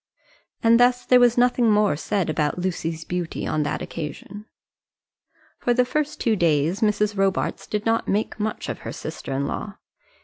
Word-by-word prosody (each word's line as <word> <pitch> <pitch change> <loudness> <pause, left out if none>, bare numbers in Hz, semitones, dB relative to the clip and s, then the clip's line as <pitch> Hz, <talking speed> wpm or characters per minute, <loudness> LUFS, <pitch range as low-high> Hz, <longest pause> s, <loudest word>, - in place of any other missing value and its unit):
And 230 +1 +5
thus 245 0 +3
there 250 - +6
was 245 -1 +4
nothing 245 -1 +3
more 210 -6 +3
said 185 +4 -1
about 155 -1 -1
Lucy's 165 -3 -3
beauty 175 -2 -3
on 155 - 0
that 150 - -2
occasion. 170 +6 -7 1.1
For 245 - +1
the 250 0 +3
first 300 +3 -2
two 225 -2 +2
days 165 0 +1
Mrs. 210 -1 +1
Robarts 195 -1 -1
did 210 0 -3
not 225 0 +1
make 210 +2 -1
much 215 +1 -3
of - - -4
her - - -6
sister - - -7
in 135 +1 -1
law. 200 +7 -5
210 Hz, 170 wpm, -23 LUFS, 165-230 Hz, 1.1 s, there